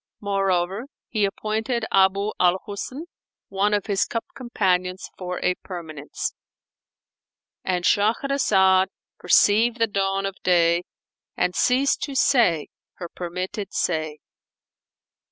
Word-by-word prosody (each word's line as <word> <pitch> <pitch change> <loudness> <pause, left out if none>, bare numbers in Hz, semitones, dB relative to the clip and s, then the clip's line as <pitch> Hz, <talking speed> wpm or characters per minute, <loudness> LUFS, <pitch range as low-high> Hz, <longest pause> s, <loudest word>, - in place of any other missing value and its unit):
Moreover, 195 +1 0 0.2
he 215 -3 +1
appointed 220 +4 -2
Abu 195 +2 +3
al 180 0 +4
Husn 230 +8 -6 0.5
one 195 +2 +1
of 205 -2 0
his 200 -2 +1
cup 230 - -4
companions 185 -7 -1
for 180 -1 -5
a 180 - +3
permanence,—And 175 +2 -8
Shahrazad 205 -4 +3 0.3
perceived 225 +3 +4
the 230 - +3
dawn 195 -2 -1
of 195 -1 -4
day 170 -1 +3 0.5
and 180 - +1
ceased 260 +2 +2
to 280 -2 -7
say 225 - +3 0.2
her 175 -2 -8
permitted 185 +4 -5
say. 155 -3 -1
195 Hz, 105 wpm, -23 LUFS, 180-215 Hz, 0.5 s, al